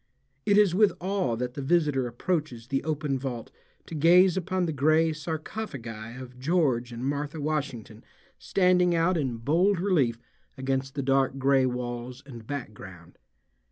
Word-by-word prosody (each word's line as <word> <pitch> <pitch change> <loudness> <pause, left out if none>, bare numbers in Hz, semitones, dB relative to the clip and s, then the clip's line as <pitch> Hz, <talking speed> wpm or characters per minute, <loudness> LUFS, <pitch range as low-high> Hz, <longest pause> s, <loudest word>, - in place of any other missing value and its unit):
It 205 -1 +5
is 205 -4 +5
with 210 +2 +4
awe 185 -10 -1
that 125 +1 -3
the 140 - -5
visitor 145 -4 +1
approaches 125 -1 -3
the 135 +2 -2
open 150 -3 -1
vault 125 -3 -5 0.3
to - - -10
gaze 175 +4 +5
upon 185 0 -1
the 160 - -2
gray 155 +3 +3
sarcophagi 140 - -6
of 125 -1 -11
George 130 -5 +1
and 120 +2 -5
Martha 145 +2 -3
Washington 140 -7 -4 0.4
standing 180 -2 +3
out 165 +3 +2
in 130 -7 -1
bold 170 - +2
relief 145 - +1 0.4
against 135 0 -2
the 140 - -2
dark 135 0 +2
gray 135 -1 +3
walls 125 +1 -5
and 120 -5 -11
background. 95 -10 -8
140 Hz, 150 wpm, -27 LUFS, 125-165 Hz, 0.4 s, It